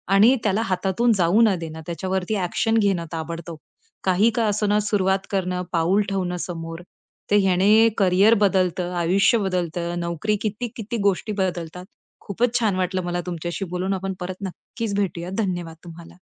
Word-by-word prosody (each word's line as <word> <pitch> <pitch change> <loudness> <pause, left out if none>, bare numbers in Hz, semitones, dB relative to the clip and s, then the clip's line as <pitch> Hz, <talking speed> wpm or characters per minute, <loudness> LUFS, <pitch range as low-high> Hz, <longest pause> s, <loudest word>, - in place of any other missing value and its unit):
आणि 220 +6 +6
त्याला 210 +1 +1
हातातून 195 +3 +1
जाऊ 185 +4 +3
न 215 -4 +4
देणं 160 -1 -7
त्याच्यावरती 185 +4 -2
ॲक्शन 205 +4 0
घेणं 195 -5 +1
ताबडतोब. 165 0 -5 0.5
काही 190 +4 +3
का 230 - +1
असेना 210 0 +1
सुरुवात 195 -2 0
करणं, 180 -2 -1
पाऊल 175 +4 +2
ठेवणं 185 -2 -2
समोर, 165 -1 -6 0.5
तर - - +5
ह्याने 200 +4 +4
करियर 195 +2 +5
बदलतं, 185 -2 +1
आयुष्य 185 +7 +3
बदलतं, 175 -3 -2
नोकरी, 170 +5 -1
किती-किती 220 +1 -4
गोष्टी 200 +3 -3
बदलतात. 180 -2 -3 0.4
खूपच 235 +4 0
छान 215 -5 +1
वाटलं 185 0 -1
मला 175 0 -2
तुमच्याशी 175 +2 -4
बोलून 180 +2 -2
आपण 190 0 -3
परत 180 0 -4
नक्कीच 215 +4 -6
भेटूयात. 180 -3 -2
धन्यवाद 175 -6 -2
तुम्हाला. 170 0 -12
185 Hz, 145 wpm, -23 LUFS, 175-205 Hz, 0.5 s, आणि